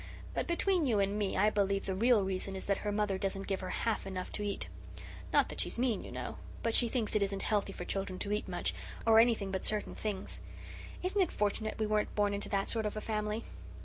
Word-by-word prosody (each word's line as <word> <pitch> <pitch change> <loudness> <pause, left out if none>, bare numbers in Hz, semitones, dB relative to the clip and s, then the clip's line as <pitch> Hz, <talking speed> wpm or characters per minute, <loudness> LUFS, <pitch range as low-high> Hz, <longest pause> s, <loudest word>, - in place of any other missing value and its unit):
But, - - -1
between 345 -2 +2
you 220 -5 +3
and 200 +1 +2
me, 205 -2 0
I 210 +2 +4
believe 200 -1 +1
the 190 - -1
real 225 +2 +4
reason 190 0 -2
is 190 - -5
that 200 -1 +2
her 210 - -1
mother 205 -2 0
doesn't 195 0 -2
give 195 -1 -1
her 185 - -5
half 225 -3 -1
enough 185 -1 -4
to - - -3
eat. 205 -1 -2 0.7
Not - - +5
that - - -1
she's - - -1
mean, 240 -4 +1
you - - -8
know - - -5 0.3
but 230 - +1
she 240 - +6
thinks 225 -4 0
it 210 - +3
isn't 195 0 0
healthy 205 -2 +1
for 180 - -6
children 195 -1 -2
to 200 +2 -2
eat 210 +1 0
much, - - 0 0.3
or 225 -1 +7
anything 225 -4 +3
but 190 - -2
certain 210 -1 -1
things. 205 -3 -4 0.6
Isn't 385 +2 +2
it 360 - +2
fortunate 210 +1 -1
we 220 - +1
weren't 210 0 0
born 205 -1 +2
into 200 +1 -2
that 195 -1 +1
sort 220 -2 0
of 210 - -4
a - - 0
family?" 215 +1 -2
210 Hz, 240 wpm, -33 LUFS, 195-220 Hz, 0.7 s, or